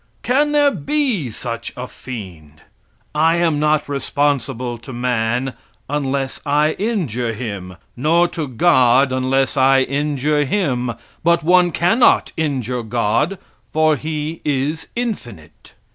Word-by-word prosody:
Can 290 +4 +2
there 290 -1 +4
be 275 - -1
such 115 +1 -5
a 125 +1 -5
fiend? 85 -14 -10 0.5
I 160 +2 +3
am 165 -3 +1
not 150 0 +2
responsible 135 -4 -1
to 120 - -10
man 120 +1 -1 0.3
unless 135 -2 -2
I 150 +1 +2
injure 145 - -1
him; 100 -6 -6 0.2
nor 165 +7 +3
to 165 -4 -4
God 130 -2 +4
unless 130 +2 +1
I 135 0 +5
injure 145 +2 0
Him, 130 - -1 0.3
but 170 0 +3
one 180 +1 +4
cannot 180 +10 +3
injure 130 -6 -2
God, 120 - 0 0.3
for 155 0 +3
"He 155 +2 -4
is 145 +3 -1
infinite." 120 - -6
140 Hz, 120 wpm, -19 LUFS, 125-160 Hz, 0.5 s, I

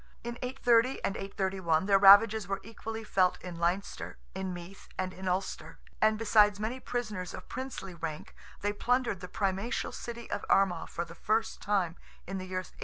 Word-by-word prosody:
In 240 +1 -5
830 250 -1 +3
and 195 - -1
831, 190 -4 0
their 195 -1 +5
ravages 205 +1 +8
were 195 0 -2
equally 225 +1 -6
felt 185 -4 +2
in 175 -2 -7
Leinster, 175 +4 -2 0.2
in 190 -1 -3
Meath, 175 +2 -9
and 185 0 -2
in 190 +1 -7
Ulster, 180 -3 -2 0.2
and 215 0 +4
besides 210 -2 +4
many 225 +5 -2
prisoners 215 -8 -4
of - - -10
princely 255 -7 -6
rank, 160 -2 -6 0.3
they 205 +1 0
plundered 245 -2 +1
the 180 - -7
primatial 195 +5 -1
city 235 -1 -7
of - - -2
Armagh 195 -2 +3
for 170 - -3
the 170 - -11
first 220 +5 -1
time, 190 -5 0 0.3
in 195 +1 -4
the 185 - -6
year 185 0 -2
832. - - -16
195 Hz, 180 wpm, -30 LUFS, 185-225 Hz, 0.3 s, ravages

